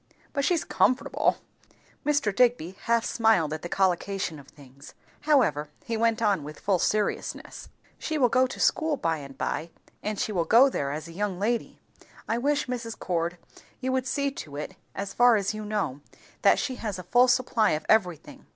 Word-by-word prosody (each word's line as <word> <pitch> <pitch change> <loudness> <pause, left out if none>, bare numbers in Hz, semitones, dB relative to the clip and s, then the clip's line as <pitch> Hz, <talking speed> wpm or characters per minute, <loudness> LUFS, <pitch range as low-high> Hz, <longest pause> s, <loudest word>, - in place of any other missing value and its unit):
But 280 - 0
she's 335 +2 +2
comfortable." 255 +2 +1 0.7
Mr. 285 -9 +1
Digby 235 -8 +2
half 235 -1 +2
smiled 220 -10 +2
at 155 - -5
the 175 - -6
collocation 190 -3 0
of 140 - -15
things, 140 -1 -15 0.3
however 155 - +3
he 230 - -3
went 230 0 +1
on 200 -7 +2
with 150 +1 -9
full 195 -3 +1
seriousness. 210 +4 -2 0.3
"She 315 - -2
will 260 -4 +4
go 255 +2 +3
to 255 - -8
school 315 -2 +2
by 165 -6 0
and 140 -2 -10
by, 160 +2 -3 0.3
and 210 -1 -3
she - - -1
will 175 -5 0
go 260 +8 +6
there 140 - -2
as 155 +2 -5
a - - -10
young 200 0 -2
lady. 230 +4 -2 0.5
I 230 - 0
wish, 290 +3 +1
Mrs. 235 -3 -5
Cord, 170 0 -2 0.4
you 260 0 -2
would 260 0 0
see 280 +3 0
to 150 - -9
it, 150 +6 -6 0.2
as 195 0 -4
far 245 -1 +5
as 200 -1 0
you 215 0 -6
know, 205 -10 -2 0.4
that - - +5
she 255 -2 -2
has 210 -4 -4
a 180 - -7
full 245 +8 +4
supply 250 -5 +2
of 155 0 -3
everything. 180 -8 0
210 Hz, 190 wpm, -27 LUFS, 170-245 Hz, 0.7 s, go